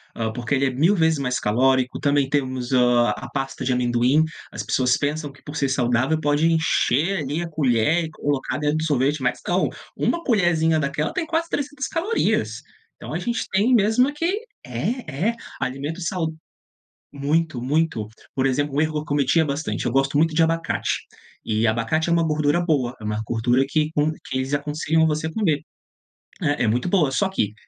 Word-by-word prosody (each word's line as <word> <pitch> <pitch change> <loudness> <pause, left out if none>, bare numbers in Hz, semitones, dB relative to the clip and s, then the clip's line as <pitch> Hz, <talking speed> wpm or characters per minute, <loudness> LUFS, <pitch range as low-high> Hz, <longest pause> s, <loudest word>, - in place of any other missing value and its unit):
hã, 110 -1 -2
porque 120 +4 -3
ele 135 0 +2
é - - +2
1000 155 +10 +3
vezes 160 -3 +2
mais 125 -2 -1
calórico, 130 +4 +2
também 145 -1 +2
temos, 130 -3 -1
hã, 125 -1 +4
a - - -8
pasta 135 -1 -4
de 130 - 0
amendoim, 125 +4 +3 0.3
as 110 - -5
pessoas 125 +4 +1
pensam 145 0 -2
que 135 -1 -20
por 145 - -8
ser 140 -3 0
saudável 130 +4 +1
pode 145 +1 +1
encher, 165 +2 +2
ali, 150 +3 -2
a 170 - -3
colher 150 +2 +2
e 160 - -6
colocar 145 -4 -2
dentro 150 +1 0
do 155 - -1
sorvete, 145 -1 +1
mas 125 -1 0
não, 180 +2 +2 0.3
uma 340 - 0
colherzinha 170 - +2
daquela 150 +1 -1
tem 370 -3 -1
quase 330 +1 -1
300 290 0 -3
calorias. 370 +8 0 0.4
Então - - -8
a - - -1
gente 235 -1 -2
tem 210 +7 +3
mesmo 220 +4 +4
é - - -4
que 340 +7 -1 0.3
é, 175 - -2
é, 235 - -2 0.3
alimento 140 +6 -3
sau 165 -1 -2 0.8
muito, 145 -1 0
muito. 145 -4 0 0.3
Por 135 0 +1
exemplo, 140 +2 0
o 145 - +3
erro 155 0 0
que 150 - 0
eu 150 - -7
cometia 145 +2 +2
bastante, 145 +2 -3
eu - - 0
gosto 135 +2 +1
muito 160 +1 +3
de 165 - +5
abacate, 165 +1 0 0.5
e 110 +1 +1
abacate 120 +10 0
é - - +1
uma 170 -1 +3
gordura 150 +1 +1
boa, 140 -8 0
é - - -12
uma 105 0 -2
gordura 120 +4 +2
que 155 0 +1
com 150 +1 +2
que 145 -4 -6
eles 130 +2 -2
aconselham 155 +2 +1
você 155 +1 -1
comer, 160 -7 +1 0.8
é 145 -4 +1
é - - +2
muito 120 +7 0
boa. 170 -7 +3
Só 190 +8 +1
que, 105 - -1
145 Hz, 195 wpm, -23 LUFS, 130-165 Hz, 0.8 s, de